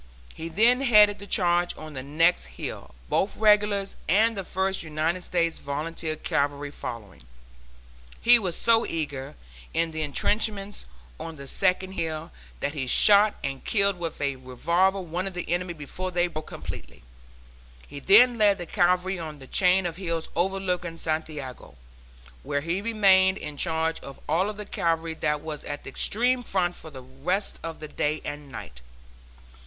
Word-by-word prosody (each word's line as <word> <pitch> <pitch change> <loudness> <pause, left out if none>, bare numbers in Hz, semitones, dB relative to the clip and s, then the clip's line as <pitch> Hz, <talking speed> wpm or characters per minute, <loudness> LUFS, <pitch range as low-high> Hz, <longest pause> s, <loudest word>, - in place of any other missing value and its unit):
He 165 +1 -6
then 230 +9 +4
headed 210 -5 +6
the 200 - -9
charge 175 -3 +1
on 155 -1 -9
the 130 - -5
next 160 +6 +2
hill, - - -6
both 195 - 0
regulars 210 -2 +3
and 220 +6 +4
the 195 - -4
First 190 +1 -1
United 160 +3 -1
States 170 -2 0
Volunteer 155 +2 -4
Cavalry 145 -1 -2
following. 110 - -8 1.0
He 240 0 +7
was 185 -6 -2
so 230 -1 +4
near 145 - -4 0.4
the 160 -1 -1
intrenchments 200 +6 0 0.3
on 165 -1 -6
the 140 -2 -9
second 185 +5 0
hill, 160 -4 -4 0.3
that 145 - -1
he 135 -4 -3
shot 205 +9 +5
and 135 -1 -4
killed 200 -3 +3
with 165 -2 -4
a 140 -2 -1
revolver 170 +10 +1
one 180 +1 -3
of 190 - -7
the 180 - -4
enemy 175 +1 -2
before 165 +5 -6
they 175 -1 +1
broke 155 -3 -6
completely. - - -8 0.8
He 145 - -8
then 230 - +6
led 205 -2 +5
the 175 - -5
cavalry 180 +1 +1
on 155 -2 -6
the 135 - -12
chain 185 +5 +3
of 170 -1 -3
hills 170 -4 -3
overlooking 180 -2 -1
Santiago, 155 - -5 0.7
where 145 - -2
he 170 +5 -2
remained 195 -4 +4
in 150 -1 -7
charge 160 +1 -1
of 140 - -11
all 180 +7 +1
the 210 0 -7
cavalry 165 -4 -1
that 150 -2 -1
was 155 -1 -6
at 145 0 -6
the - - -8
extreme 245 +4 +1
front 180 -6 -1
for 160 - -11
the 130 -4 -11
rest 145 +10 -3
of 165 -1 -6
that 155 -1 -9
day 150 +1 0
and 145 -1 -6
night. 60 - -9
170 Hz, 160 wpm, -26 LUFS, 150-195 Hz, 1.0 s, He